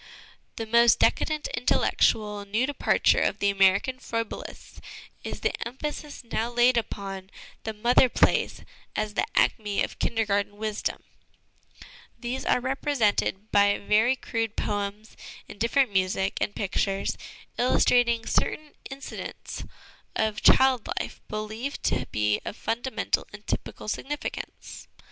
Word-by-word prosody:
" - - -30
The 225 - -4
most 235 +1 +5
decadent 310 -1 +1
intellectual 210 -2 +1
new 215 +5 0
departure 285 0 +2
of - - +1
the 200 0 +2
American 200 +6 +3
Froebelists 230 -2 -5 0.4
is - - -5
the - - +1
emphasis 290 +3 -6
now 230 0 -2
laid 240 +1 +4
upon 195 -4 -3 0.4
the 220 - -2
mother 245 +4 +4
plays - - +2 0.3
as 215 -1 -1
the 415 - 0
acme 210 -3 +2
of - - -5
Kindergarten 205 -2 0
wisdom 215 -1 -3 1.2
These 250 +2 -4
are - - +3
represented 245 -6 0
by 205 0 +4
very 220 +5 +3
crude 225 -4 -3
poems, 205 +1 -3 0.3
indifferent 230 +4 +1
music 190 0 +1
and 205 - -1
pictures, 195 0 -1 0.4
illustrating 240 -2 +3
certain 305 +5 -1 0.2
incidents 270 0 -7 0.5
of 215 -1 0
child 260 -3 +5
life - - -6
believed 220 +6 -5
to 125 - 0
be 105 -1 0
of 210 - -6
fundamental 240 +3 -1
and - - -12
typical - - -4
significance. 295 +1 -5
220 Hz, 120 wpm, -27 LUFS, 205-250 Hz, 1.2 s, most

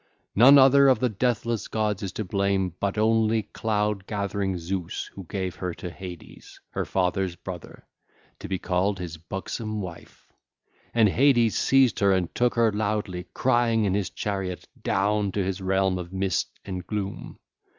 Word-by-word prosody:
None 130 +6 +8
other 140 +1 +7
of 130 - +5
the 125 - +1
deathless 115 0 -1
gods 105 -3 -1
is 95 -3 -3
to 110 - -3
blame, 95 -1 0
but 100 +1 -1
only 110 0 +2
cloud 105 -3 -2
gathering 100 -2 -2
Zeus 85 0 -4
who 95 - -9
gave 95 0 -3
her 90 -2 -4
to 90 - -7
Hades, 90 -1 -11
her - - -2
father's 95 -1 0
brother, 90 -2 -9 0.5
to - - -7
be 95 - -1
called 95 +3 0
his 85 -2 -6
buxom 105 +6 -5
wife. 90 -4 -10 0.6
And 115 -2 +4
Hades 120 -1 +3
seized 135 -3 +3
her 100 -1 +4
and 90 -2 -1
took 120 0 +1
her 115 -2 +3
loudly 100 -4 -2
crying 120 -3 +2
in 95 - +1
his 100 -1 0
chariot 95 -3 -4
down 100 0 +1
to 100 - 0
his 95 0 -3
realm 95 0 +1
of 85 0 -7
mist 95 -2 -2
and 90 -2 -5
gloom. 100 -2 -4
100 Hz, 160 wpm, -26 LUFS, 95-110 Hz, 0.6 s, None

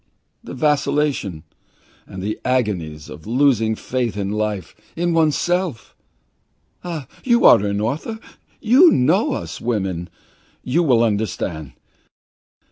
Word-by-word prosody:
The - - -8
vacillation! 140 - 0 0.6
And 95 0 -8
the 105 +2 -3
agonies 95 - -1
of 80 +5 -11
losing 115 -3 +2
faith 120 -2 -3
in 100 -1 -2
life, 105 -4 -3 0.2
in 175 +1 0
oneself! 165 - 0 0.9
Ah, 165 -6 -5 0.2
you 240 -1 +3
are - - +7
an 100 0 -1
author. 145 - -3 0.4
You 265 +11 +6
know 190 - +2
us - - -6
women. 95 -7 -2 0.5
You 135 +8 +1
will 125 -8 +3
understand. 100 - -2
120 Hz, 115 wpm, -20 LUFS, 100-155 Hz, 0.9 s, are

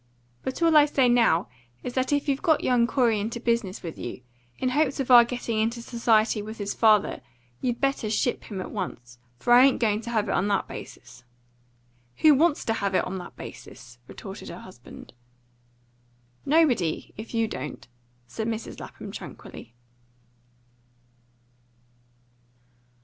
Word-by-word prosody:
But 260 +6 -3
all 330 -1 +4
I 295 -1 +7
say 270 -3 +2
now 235 -8 +3 0.4
is 245 - -5
that 260 +1 0
if 290 +1 0
you've 275 -1 0
got 320 -5 +2
young 245 -2 +3
Corey 240 -5 +2
into 225 +3 -3
business 230 -5 -1
with 165 -2 -7
you, 120 - -6 0.4
in 255 - 0
hopes 280 +1 +1
of 265 -1 -1
our 240 -1 +10
getting 235 -2 -3
into 230 +2 0
society 230 -2 +2
with 215 +2 -8
his 205 -1 -3
father, 215 -3 +3 0.4
you 245 -2 -1
better 275 -5 -1
ship 240 +3 -1
him 200 -3 -6
at - - -7
once. 120 - -6 0.2
For 240 - +2
I 245 +1 +8
ain't 270 0 +4
going 215 -2 +1
to 235 - -7
have 220 -2 0
it - - -1
on 195 - +1
that 200 -1 0
basis." 120 - -11 1.0
"Who 310 -1 +7
wants 300 +2 +2
to 225 - +1
have 200 -3 -1
it - - +2
on 190 - -4
that 180 - -10
basis?" 120 +1 -11
retorted 195 0 -9
her 170 - -9
husband. 125 -10 -13 1.3
"Nobody, 270 - +2
if 225 +2 -8
you 225 -1 +2
don't," 150 - -7 0.4
said 220 - -5
Mrs. 225 0 -5
Lapham - - -9
tranquilly. 115 - -10
230 Hz, 160 wpm, -26 LUFS, 200-255 Hz, 1.3 s, our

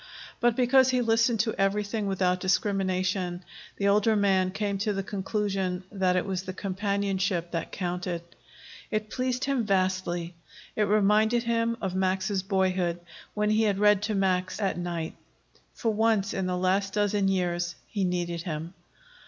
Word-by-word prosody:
But 240 -1 +3
because 260 +1 +4
he 255 -1 +2
listened 230 -1 +3
to 220 0 -1
everything 205 +2 0
without 185 -2 +1
discrimination, 185 -2 0 0.3
the 200 - +1
older 210 +2 +4
man 190 -2 +3
came 200 0 -2
to 210 +1 0
the 195 0 -2
conclusion 195 -2 -2
that 190 -3 +1
it 180 - +1
was 190 -2 -2
the 185 0 -6
companionship 195 -2 -1
that 165 - -3
counted. 180 -1 -3 0.7
It 215 0 -2
pleased 255 0 -1
him 275 -3 0
vastly. 185 -3 0 0.4
It 210 -1 +2
reminded 215 +3 +3
him 230 0 0
of 190 -2 -2
Max's 190 +1 0
boyhood, 185 -3 0 0.4
when 210 0 +1
he 215 +1 +3
had 205 -3 +2
read 210 -1 +4
to 215 0 -1
Max 185 -1 0
at 195 -3 0
night. 170 -2 -3 0.6
For 225 -2 0
once 215 -2 +2
in 190 -1 -1
the 180 0 -1
last 190 +2 +1
dozen 205 -1 +1
years, 175 -2 0
he 200 -3 -3
needed 175 -2 -1
him. 165 0 -5
195 Hz, 155 wpm, -27 LUFS, 185-210 Hz, 0.7 s, because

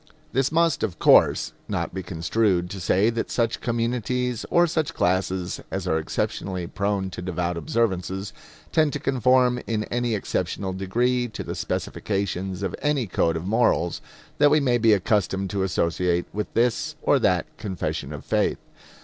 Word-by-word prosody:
This 135 +2 +1
must, 165 -1 +2
of 100 -6 -2
course, - - +5 0.2
not - - -2
be 95 - -3
construed 90 +1 0
to 100 - -5
say 95 +5 +2
that 115 0 -3
such 115 -2 0
communities 120 +1 -1
or 175 0 +5
such 160 -2 -1
classes 95 0 0
as 95 -1 -3
are 80 -2 +2
exceptionally 90 +3 -3
prone 100 +1 -2
to 90 - -6
devout 90 -1 -2
observances 95 +1 -1 0.4
tend 155 -2 +3
to 150 - -2
conform 125 -2 +3
in 110 -2 0
any 120 -2 0
exceptional 95 -1 -2
degree 120 +6 0
to 110 - -6
the - - -5
specifications 95 -2 -3
of 95 - -2
any 145 -4 +1
code 85 -4 +1
of 80 - -6
morals 105 -5 +1 0.4
that 145 0 +6
we 150 +1 +4
may 125 -4 +2
be 115 -1 +4
accustomed 95 -1 0
to 100 -2 -1
associate 90 -1 0
with 105 0 -3
this 120 0 +1
or - - +4
that - - +2
confession 95 -4 -3
of - - -8
faith. - - +1
100 Hz, 160 wpm, -24 LUFS, 90-120 Hz, 0.4 s, that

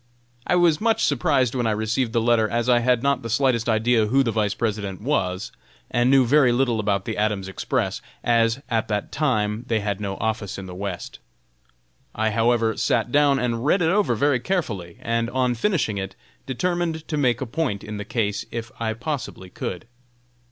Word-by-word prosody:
I - - +3
was 175 -2 +3
much 225 0 +2
surprised 130 -3 +2
when 120 -3 0
I 105 -1 0
received 110 +3 0
the 115 - +1
letter, 115 -2 +3
as 120 +1 -1
I 125 -1 +5
had 120 0 +2
not 140 -1 +2
the 115 - -6
slightest 120 -1 +1
idea 110 0 +3
who 135 +5 +3
the 115 - 0
Vice 105 -2 0
President 100 -4 -2
was, 100 -7 -1 0.4
and 120 +1 +2
knew 135 -1 +5
very 135 0 +4
little 120 -2 +1
about 100 -2 0
the 110 - -4
Adams 105 -2 0
Express, 95 - -2 0.2
as, 115 +2 +2
at 115 -2 0
that 105 -1 -2
time, 110 -7 0
they 115 -2 +1
had 100 -1 -3
no 100 -2 -3
office 110 -3 -2
in 95 - -7
the 90 - -8
West. 95 -1 -6 1.0
I, 110 0 +1
however, 115 0 +2
sat 120 - +1
down 145 0 +4
and 120 -2 -1
read 170 +6 +3
it 160 - +3
over 195 - +2
very 140 +2 +2
carefully, 115 - -3
and, 115 0 0
on 125 0 +1
finishing 120 - 0
it, 95 0 -5 0.3
determined 165 +4 -2
to 155 - -2
make 125 -5 +2
a 130 - -3
point 120 -5 -2
in 105 -1 -6
the 105 - -4
case 105 -1 -1
if 115 0 -6
I 110 -1 -1
possibly 115 -6 -5
could. 90 +4 -5
115 Hz, 195 wpm, -23 LUFS, 105-130 Hz, 1.0 s, I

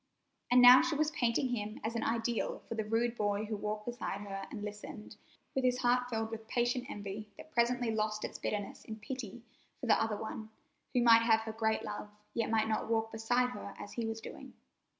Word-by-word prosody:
And 245 0 +7
now 250 +1 +11
she 335 -1 0
was 305 +1 +1
painting 250 -2 +1
him 215 -3 -3
as 225 +2 -2
an 230 - -1
ideal 230 0 -1
for - - -4
the 220 -1 -1
rude 230 +2 0
boy 205 -1 0
who 215 0 -3
walked 210 +1 -3
beside 240 -4 -4
her 195 -1 -6
and 210 - -6
listened, 210 +1 -7 0.4
with 265 - 0
his 250 0 +3
heart 245 0 +2
filled 225 -1 -2
with 220 -1 -7
patient 245 +2 0
envy; 205 -2 -6
that 315 - -12
presently 240 -2 +2
lost 215 0 -1
its - - -7
bitterness 205 -1 -3
in 220 - -6
pity 235 0 -7 0.4
for - - -5
the 225 - +4
other 225 -2 0
one, 220 0 -6 0.5
who 245 - +4
might 230 -1 +8
have 225 -1 +4
her 220 0 -5
great 220 0 0
love, 210 0 -5 0.2
yet 230 - 0
might 220 0 +2
not 220 0 -1
walk 225 -1 +1
beside 245 +3 +1
her 200 -5 -7
as 205 - -8
he 235 -2 -2
was 225 0 -3
doing. - - -10
225 Hz, 210 wpm, -33 LUFS, 215-245 Hz, 0.5 s, now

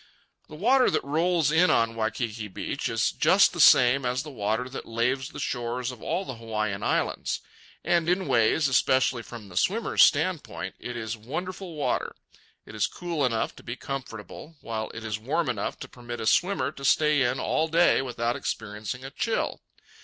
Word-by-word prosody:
The 155 - -10
water 250 - +4
that - - 0
rolls 160 +1 +1
in 170 +4 +4
on 115 0 +2
Waikiki 110 -1 -3
Beach 95 - -4
is - - +1
just - - +4
the - - -6
same 125 +2 +6
as 125 +2 -1
the 150 - -9
water 110 +1 -1
that 135 - -8
laves 125 +4 0
the - - -11
shores 125 -1 -2
of 120 -3 -12
all 180 +4 -2
the 130 - -6
Hawaiian 110 -3 -3
Islands; - - -1 0.4
and 170 -1 +2
in 185 +1 +1
ways, 120 +6 +3
especially 130 -1 +2
from 115 -2 -10
the 90 - -13
swimmer's 210 - +1
standpoint, 145 - +1
it 120 -1 -6
is 110 -1 -4
wonderful 175 - -6
water. 145 - -1 0.5
It - - -12
is - - +1
cool 170 -4 -3
enough 115 -4 0
to - - -11
be 120 - -6
comfortable, 135 +3 -7
while 110 -1 -4
it 115 - -8
is 105 -1 -3
warm 145 +8 -1
enough 100 -4 -2
to - - -6
permit 120 -1 -8
a 110 - -4
swimmer 140 - +2
to 140 - -12
stay 150 +1 +3
in 125 0 +1
all 160 - 0
day 165 -1 +4
without 120 -2 -2
experiencing 110 +4 -5
a 135 - -7
chill. 230 - -2
125 Hz, 185 wpm, -26 LUFS, 115-155 Hz, 0.5 s, same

